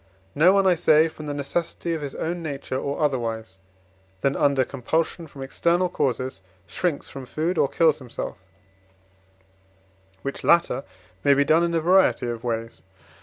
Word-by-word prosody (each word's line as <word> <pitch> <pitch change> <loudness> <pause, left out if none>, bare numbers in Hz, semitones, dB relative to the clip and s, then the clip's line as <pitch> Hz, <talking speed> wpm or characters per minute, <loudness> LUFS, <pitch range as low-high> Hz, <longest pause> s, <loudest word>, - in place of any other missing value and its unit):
No 165 +5 +5
one, 195 0 +3
I 185 - +6
say, 160 -2 +4
from 155 -1 -9
the 145 - -2
necessity 165 +4 -2
of 160 - -3
his 140 -2 -5
own 170 +2 -3
nature, 140 -4 -5
or 140 +3 -2
otherwise 115 -7 -3 0.6
than 140 0 +1
under 140 -2 +2
compulsion 160 +6 -2
from 140 -2 -9
external 170 +6 +1
causes, 130 - -2 0.2
shrinks 170 -6 -2
from 135 -2 -9
food, 160 +7 -1
or 145 - +4
kills 160 -3 +3
himself: 125 -6 -6 1.8
which 140 - -5
latter 170 -6 +3 0.4
may 140 - +5
be 140 +1 +3
done 160 +4 +4
in 170 0 0
a - - +3
variety 180 -3 +3
of 120 -1 -4
ways. 115 -1 -4
145 Hz, 160 wpm, -24 LUFS, 130-170 Hz, 1.8 s, I